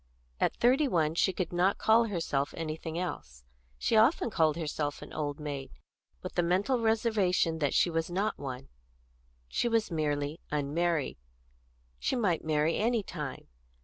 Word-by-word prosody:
At - - +1
thirty 265 +5 +4
one 160 - +1
she 180 +3 +2
could 180 -2 -3
not 180 +3 +2
call 225 +1 +4
herself 165 -9 -1
anything 160 0 -4
else; 65 - -5 0.3
she 140 - 0
often 230 +2 +4
called 160 -4 +2
herself 150 -2 -3
an - - -11
old 145 -1 -3
maid, 145 -3 -5 0.5
with - - -6
the 175 - +2
mental 190 +9 +1
reservation 210 -7 +2
that 145 -3 0
she 175 - +4
was 165 0 -1
not 195 +5 -1
one. 135 -2 -6 0.8
She 240 - 0
was 225 -4 +1
merely 150 -1 -1
unmarried; 150 +2 0 0.8
she - - 0
might 200 -9 +1
marry 155 +1 +1
any 230 0 +1
time. 150 -8 -6
170 Hz, 150 wpm, -30 LUFS, 150-205 Hz, 0.8 s, thirty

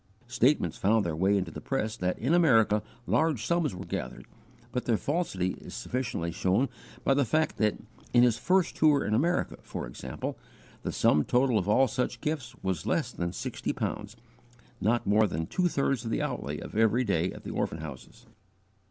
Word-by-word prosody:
Statements 120 - +1
found 110 +1 +3
their 85 -2 -1
way 95 +5 +3
into 90 -3 -2
the - - -8
press 110 0 -2
that 90 0 -1
in 130 +8 0
America 115 -11 +4 0.2
large 150 -8 +1
sums 170 - +1
were 95 +2 -7
gathered, 60 - -5 0.5
but 125 - -2
their 115 -3 +2
falsity 140 - -1
is - - -9
sufficiently 115 -10 -3
shown 95 +10 +1 0.3
by 135 - +4
the 140 +1 +3
fact 155 +6 +1
that 105 -1 +2 0.4
in 120 0 +6
his 120 -3 +3
first 185 -1 +2
tour 150 -2 +4
in 105 - 0
America, 170 +10 +1
for - - -6
example, 65 - -6 0.4
the - - -3
sum 75 - +3
total 125 - +2
of 95 +1 -3
all 130 +5 +5
such 125 +2 -2
gifts 135 -6 -3
was 95 0 -2
less 160 - 0
than 85 0 -3
sixty 85 - -3
pounds, - - -4 0.7
not 120 +2 +1
more 105 +2 +4
than 80 -3 -3
two 180 - +1
thirds 135 -6 0
of 115 - -4
the - - 0
outlay 75 +2 -3
of - - -9
every 115 +3 +3
day 90 -5 +1
at - - -10
the - - -5
orphan 75 - -2
houses. 75 -5 -10
115 Hz, 185 wpm, -29 LUFS, 95-135 Hz, 0.7 s, in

